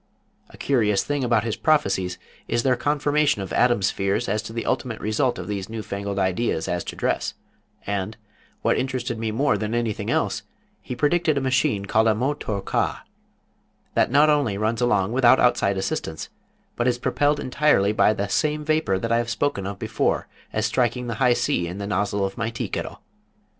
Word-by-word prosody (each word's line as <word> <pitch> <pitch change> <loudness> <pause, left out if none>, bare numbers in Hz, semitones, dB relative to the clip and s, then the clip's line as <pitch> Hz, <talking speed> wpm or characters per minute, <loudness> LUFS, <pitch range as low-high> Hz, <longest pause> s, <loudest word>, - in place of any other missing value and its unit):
A - - -15
curious 110 -7 +2
thing 145 -2 -2
about 115 -3 +2
his 115 -2 -2
prophecies 95 - +1 0.3
is 120 - 0
their 130 -2 +3
confirmation 145 -3 +1
of 95 - -7
Adam's 120 -5 +3
fears 100 0 -1
as 105 +2 0
to - - -8
the 115 0 -4
ultimate 115 -4 -2
result 110 +5 0
of - - -6
these 100 -1 -4
new 110 -1 -5
fangled 100 0 -4
ideas 95 -2 0
as 90 -1 -1
to - - -6
dress, - - -1 0.5
and, 100 +1 -3 0.5
what - - +2
interested 125 -3 -2
me 110 -1 -1
more 135 +7 +1
than 110 +2 -2
anything 115 -3 -2
else, - - 0 0.4
he 125 - -6
predicted 155 +3 +2
a - - +3
machine 130 -6 +1
called 110 +3 +2
a 110 - +4
Moh 130 +6 0
Thor 105 -9 -4
Cah, - - -1 0.9
that - - +3
not 145 +4 +5
only 140 -9 +1
runs 110 +3 -1
along 105 -5 +2
without 125 0 +5
outside 100 -5 +2
assistance, 80 -4 -3 0.5
but 120 - 0
is 120 -1 +2
propelled 145 +4 +1
entirely 130 -7 +2
by 110 - +4
the 100 -1 -2
same 150 +7 0
vapor 155 -11 +1
that 115 +4 -3
I 115 - +4
have 120 0 -2
spoken 115 -4 -1
of 100 0 -5
before - - -1 0.2
as - - 0
striking 125 0 0
the 115 - -3
high 125 -2 +5
C 120 -9 0
in 90 +3 -6
the 100 - -4
nozzle 100 -1 0
of 95 +4 -5
my 115 0 0
tea 115 - -4
kettle. - - -5
115 Hz, 195 wpm, -24 LUFS, 100-130 Hz, 0.9 s, not